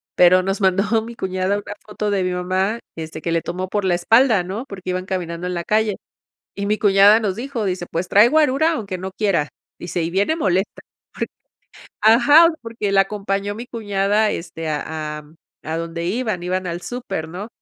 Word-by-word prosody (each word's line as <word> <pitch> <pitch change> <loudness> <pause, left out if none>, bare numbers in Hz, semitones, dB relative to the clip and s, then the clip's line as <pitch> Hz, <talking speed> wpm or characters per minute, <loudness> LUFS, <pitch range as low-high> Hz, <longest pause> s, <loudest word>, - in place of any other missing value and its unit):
pero 185 +1 +6
nos 195 +1 -2
mandó 200 +4 +2
mi 235 +1 -9
cuñada 185 -1 -1
una 205 - -6
foto 210 0 -3
de 195 -2 +1
mi 180 - -1
mamá, 185 +5 -1 0.2
este, 160 -1 -6
que 170 - -2
le 165 0 +1
tomó 185 +3 -4
por 205 0 -1
la 180 -2 +2
espalda, 225 +3 +4
¿no?, 200 +8 -5
porque 185 -2 -8
iban 185 0 -3
caminando 180 -2 -4
en 180 - -3
la 170 -1 -3
calle 215 +1 +1 0.6
y 200 - -3
mi 210 +1 +1
cuñada 205 +1 +6
nos 205 -4 -1
dijo, 240 -1 -4
dice: 180 -2 -2
"Pues 170 +2 -2
trae 210 +3 +6
guarura, 310 +1 +3
aunque 200 -8 -4
no 190 +1 -6
quiera", 185 -8 0 0.3
dice: 175 0 -3
"Y 165 - -1
viene 200 - +1
molesta 190 - -1 0.3
porque", - - -4 0.7
ajá, 255 +10 +7
porque 225 -3 -3
la 195 0 +6
acompañó 200 0 -3
mi 235 +3 -7
cuñada, 210 -2 0
este, 165 -1 -5
a 155 0 -4
a - - -17 0.4
a 160 +1 -3
donde 165 0 -4
iban, 215 -2 -2
iban 185 +1 -2
al 170 0 -4
súper, 195 -10 -5
¿no?, 185 +6 -7
195 Hz, 195 wpm, -20 LUFS, 180-215 Hz, 0.7 s, ajá